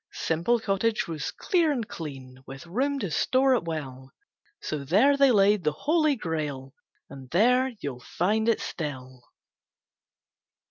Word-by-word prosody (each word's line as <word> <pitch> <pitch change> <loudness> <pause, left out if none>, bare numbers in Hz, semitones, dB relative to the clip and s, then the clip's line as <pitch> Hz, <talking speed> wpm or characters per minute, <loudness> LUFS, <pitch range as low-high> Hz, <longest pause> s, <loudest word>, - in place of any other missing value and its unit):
Simple 170 +9 0
Cottage 215 +1 0
was 160 -3 -4
clear 340 -5 +1
and 240 -7 -2
clean, 135 -5 -8
With 135 +3 -9
room 265 +11 -1
to 185 - -3
store 260 - +3
at 225 - -2
will; 135 -5 -6 0.5
So 150 -2 -4
there 210 - +4
they 275 -1 +5
laid 205 -3 +4
the 150 -1 +1
Holy 310 - +1
Grail, 150 - -4 0.3
And 135 -2 -12
there 250 - +3
you'll 130 -4 -5
find 215 - 0
it 230 - +1
still. 130 -5 -6
175 Hz, 140 wpm, -26 LUFS, -, 0.5 s, they